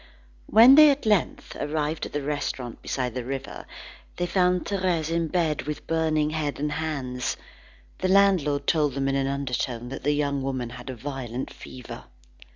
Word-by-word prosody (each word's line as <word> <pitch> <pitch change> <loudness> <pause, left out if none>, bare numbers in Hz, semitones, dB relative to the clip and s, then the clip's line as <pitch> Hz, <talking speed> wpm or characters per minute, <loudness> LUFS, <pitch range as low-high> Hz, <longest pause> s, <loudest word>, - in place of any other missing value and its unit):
When 235 +5 +8
they 305 +1 +9
at 280 -2 0
length 210 -5 0
arrived 150 +1 -2
at - - -16
the 145 -1 -2
restaurant 135 -4 -4
beside 125 -3 -2
the 125 0 -4
river, 135 +2 -6 0.5
they 175 - -1
found 180 0 +1
Thérèse 180 -5 -1
in 165 0 0
bed 160 -3 0
with 150 - -5
burning 155 -2 +1
head 150 -3 -2
and 150 +1 -1
hands. 140 -5 -3 0.6
The 185 - 0
landlord 185 -8 +3
told 150 -4 +1
them 135 0 -1
in 135 - +1
an 135 0 0
undertone, 125 -3 -3
that 135 - -6
the 145 +2 +1
young 140 -1 0
woman 130 -3 -3
had 125 +1 -9
a 130 - -5
violent 130 -1 -5
fever. 125 -2 -10
145 Hz, 170 wpm, -25 LUFS, 135-165 Hz, 0.6 s, they